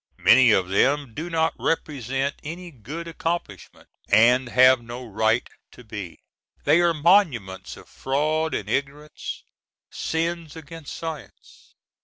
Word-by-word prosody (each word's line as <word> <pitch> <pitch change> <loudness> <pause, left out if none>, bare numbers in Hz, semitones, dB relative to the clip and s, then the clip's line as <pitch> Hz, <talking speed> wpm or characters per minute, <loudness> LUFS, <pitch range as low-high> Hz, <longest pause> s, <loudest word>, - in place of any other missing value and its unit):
Many 125 0 +6
of 95 -4 +3
them 135 +5 +1
do 160 +8 -5
not 160 -1 +1
represent 135 -3 -1
any 170 +3 -7
good 150 +7 -8
accomplishment, 165 - -5 0.2
and 120 +4 +4
have 130 0 +5
no 120 +2 -8
right 110 +2 0 0.3
to 125 - -14
be. 105 -6 -8 0.5
They 155 +4 +4
are 175 -1 +4
monuments 145 - +1
of - - -15
fraud 155 +4 -1
and - - -4
ignorance—sins 150 +3 -5
against 160 -1 -9
science. 160 -5 -9
140 Hz, 120 wpm, -24 LUFS, 120-160 Hz, 0.5 s, Many